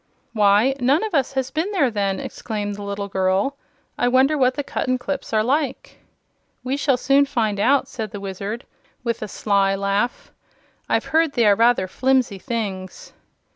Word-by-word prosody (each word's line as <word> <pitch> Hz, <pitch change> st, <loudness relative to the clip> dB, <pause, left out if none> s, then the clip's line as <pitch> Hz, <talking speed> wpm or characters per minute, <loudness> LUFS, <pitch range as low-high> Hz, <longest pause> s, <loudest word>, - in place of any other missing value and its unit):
"Why, 210 Hz, +4 st, +4 dB
none 270 Hz, -, +2 dB
of 435 Hz, -3 st, -4 dB
us 275 Hz, -3 st, +1 dB
has 265 Hz, -1 st, -2 dB
been 320 Hz, +7 st, -1 dB
there, 280 Hz, -10 st, +2 dB
then," 200 Hz, -3 st, -1 dB
exclaimed 205 Hz, -2 st, -4 dB
the 205 Hz, -, -8 dB
little 200 Hz, 0 st, -4 dB
girl. 190 Hz, +7 st, 0 dB, 0.4 s
"I -, -, +2 dB
wonder 260 Hz, +4 st, +4 dB
what 255 Hz, -3 st, +2 dB
the 290 Hz, -, -2 dB
Cuttenclips 255 Hz, +2 st, -3 dB
are 215 Hz, -1 st, +2 dB
like." 270 Hz, +2 st, -2 dB, 0.6 s
"We 260 Hz, +2 st, -1 dB
shall 280 Hz, -2 st, +1 dB
soon 275 Hz, +3 st, +3 dB
find 220 Hz, -7 st, -1 dB
out," 270 Hz, +6 st, +3 dB
said 220 Hz, -4 st, -5 dB
the 205 Hz, -, -7 dB
Wizard, 200 Hz, +4 st, -5 dB, 0.4 s
with 235 Hz, -2 st, -2 dB
a 215 Hz, -, -3 dB
sly 195 Hz, -1 st, +1 dB
laugh. 200 Hz, +4 st, -1 dB, 0.6 s
"I've -, -, +1 dB
heard 320 Hz, -2 st, +3 dB
they 235 Hz, -3 st, +2 dB
are 205 Hz, -1 st, +6 dB
rather 230 Hz, -3 st, +3 dB
flimsy 255 Hz, -2 st, +1 dB
things." 195 Hz, -5 st, -5 dB
235 Hz, 170 wpm, -22 LUFS, 200-270 Hz, 0.6 s, are